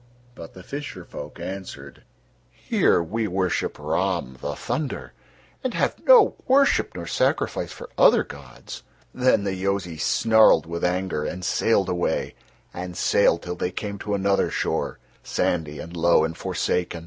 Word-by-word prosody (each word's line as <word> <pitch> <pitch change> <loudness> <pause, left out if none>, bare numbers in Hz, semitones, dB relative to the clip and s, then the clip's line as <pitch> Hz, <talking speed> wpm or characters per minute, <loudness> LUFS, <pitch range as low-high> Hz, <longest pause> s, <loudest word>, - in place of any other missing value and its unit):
But 85 -8 -11
the 95 - -11
fisher 145 +8 -7
folk - - -9
answered: 90 -8 -8 0.5
"Here 85 - +1
we 110 +6 -2
worship 95 -1 -1
Rahm, 65 +1 -1
the - - -4
Thunder, 150 -4 -4 0.5
and - - -2
have - - -1
no - - +7
worship 275 +1 +3
nor 85 - -5
sacrifice - - 0
for - - -9
other - - +6
gods." 65 -4 -11 0.3
Then 125 -5 +2
the 100 -1 -1
Yozis 95 -3 -2
snarled 110 -8 +4
with 85 +1 -5
anger 90 -3 0
and 90 +3 -4
sailed 100 +1 +2
away, 90 -1 -1 0.4
and 90 0 -6
sailed - - +3
till 90 - -4
they 90 - -2
came 100 +2 -5
to 105 +1 -2
another 100 0 +1
shore, - - -2 0.2
sandy 80 -3 -1
and 85 +1 -8
low 85 -1 +4
and 80 +1 -2
forsaken. 90 0 -2
90 Hz, 150 wpm, -24 LUFS, 85-100 Hz, 0.5 s, no